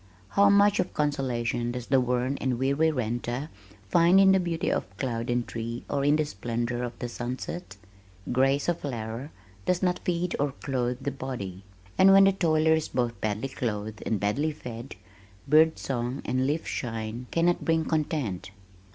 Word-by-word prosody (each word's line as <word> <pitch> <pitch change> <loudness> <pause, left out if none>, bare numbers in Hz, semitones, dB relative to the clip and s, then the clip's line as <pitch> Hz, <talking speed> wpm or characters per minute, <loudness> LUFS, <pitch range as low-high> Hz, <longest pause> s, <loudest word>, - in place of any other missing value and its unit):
How 200 - +5
much 200 0 +5
of - - -1
consolation 120 -5 -1
does 125 -1 -5
the 135 0 +3
worn 125 +2 0
and 130 -2 0
weary 140 +5 +2
renter 120 +1 -2 0.4
find 170 - +5
in 195 0 +7
the 190 - +5
beauty 170 -2 -1
of 95 +1 -3
cloud 115 -3 -2
and 120 0 0
tree 115 +1 -5
or 140 -1 0
in 145 +1 +4
the 155 0 +1
splendor 120 +1 -3
of 120 -1 -5
the 120 - -4
sunset? 120 - -5 0.5
Grace 135 +3 +2
of 175 -1 0
flower 120 0 -5 0.4
does 180 0 +1
not 180 -1 +1
feed 175 0 -1
or 145 -1 0
clothe 125 -3 -2
the 140 - -1
body, 120 -9 -6 0.4
and 190 +1 +8
when 195 0 +8
the 195 - +6
toiler 160 -4 +3
is 160 -1 0
both 120 -2 -2
badly 110 +5 -1
clothed 110 -4 -4
and 110 - -1
badly 140 +11 0
fed, 120 -3 -8 0.5
bird 160 +2 +5
song 125 0 -3
and 130 +1 0
leaf 155 +3 -1
shine 115 0 -4
cannot 170 +1 +1
bring 160 -1 +1
content." 140 - -2
130 Hz, 170 wpm, -27 LUFS, 120-160 Hz, 0.5 s, and